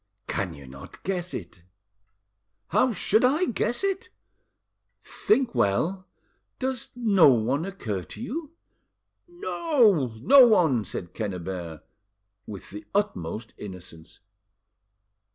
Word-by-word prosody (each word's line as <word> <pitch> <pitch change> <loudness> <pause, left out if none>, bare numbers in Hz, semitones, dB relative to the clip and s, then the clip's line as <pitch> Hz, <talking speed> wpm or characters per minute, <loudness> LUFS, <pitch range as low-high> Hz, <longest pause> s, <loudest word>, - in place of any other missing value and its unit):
"Can 90 -4 -3
you 70 -1 -12
not 70 +1 -12
guess 180 -2 -2
it?" 90 - -7 1.1
"How 255 -1 +3
should 220 +1 +2
I 295 +8 +3
guess 240 - -1
it?" 395 +3 -1 0.9
"Think 265 - 0
well. 175 - 0 0.5
Does 260 -2 -3
no 210 -9 +5
one 130 +6 +1
occur 115 - -4
to - - -11
you?" 300 +6 -5 0.7
"No, 270 - +1
no 265 - +8
one," 160 - +3
said 90 -1 -7
Quennebert, 90 -6 -5 0.6
with 100 -3 -9
the 105 +2 -8
utmost 110 - -2
innocence. 90 -5 -10
175 Hz, 105 wpm, -26 LUFS, -, 1.1 s, no